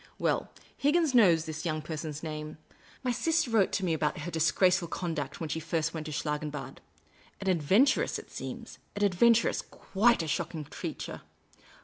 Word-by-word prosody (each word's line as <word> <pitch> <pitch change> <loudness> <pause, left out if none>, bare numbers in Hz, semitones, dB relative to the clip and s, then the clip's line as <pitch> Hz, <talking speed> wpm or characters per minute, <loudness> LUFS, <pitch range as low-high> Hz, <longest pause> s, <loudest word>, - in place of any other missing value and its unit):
Well, - - 0 0.3
Higginson 295 -2 +3
knows 170 -7 +5
this 155 -1 -5
young 155 -3 -2
person's 155 -1 -5
name; 155 -1 -5 0.5
my 250 - +1
.sister 320 +1 +1
wrote 215 -4 +3
to 190 - 0
me 170 - +1
about 150 -1 -1
her 175 +3 -5
disgraceful 170 +3 +3
conduct 160 -6 -4
when 165 - -3
she 155 +2 -2
first 160 0 -1
went 160 -2 -5
to - - -5
Schlangenbad. 150 -2 -4 0.6
An 195 - -6
adventuress, 190 - +3
it - - -11
seems; - - -7 0.2
an 205 - -1
ad 200 -2 +3
venturess; 230 +5 +4
quite 220 -1 +1
a - - -4
shocking 155 +1 -2
creature. - - -6
165 Hz, 165 wpm, -29 LUFS, 155-205 Hz, 0.6 s, knows